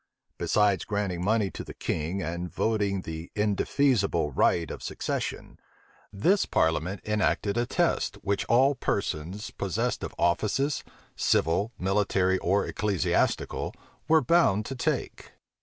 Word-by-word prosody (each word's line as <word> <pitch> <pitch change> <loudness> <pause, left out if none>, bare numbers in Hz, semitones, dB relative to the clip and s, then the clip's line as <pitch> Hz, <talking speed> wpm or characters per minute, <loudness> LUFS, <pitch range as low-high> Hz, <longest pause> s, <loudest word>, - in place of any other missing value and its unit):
Besides 105 -2 +2
granting 100 -4 -2
money 105 0 +1
to - - -6
the - - -10
king 85 +5 -2
and 85 +2 -4
voting 100 -1 0
the 80 +1 -6
indefeasible 105 - +1
right 85 +5 +2
of - - -7
succession, - - -4 0.5
this 180 - +2
parliament 80 +4 0
enacted 105 -1 0
a 120 0 0
test, - - 0
which 100 0 0
all 130 +4 +4
persons 95 - -3
possessed - - -2
of - - -5
offices, 105 +11 +1 0.3
civil, 100 +8 +1
military, 95 -1 +1
or 100 +3 +1
ecclesiastical, 105 -5 0 0.3
were 160 -1 +5
bound 120 - +3
to 135 - -5
take. 125 - -3
100 Hz, 125 wpm, -27 LUFS, 90-110 Hz, 0.5 s, were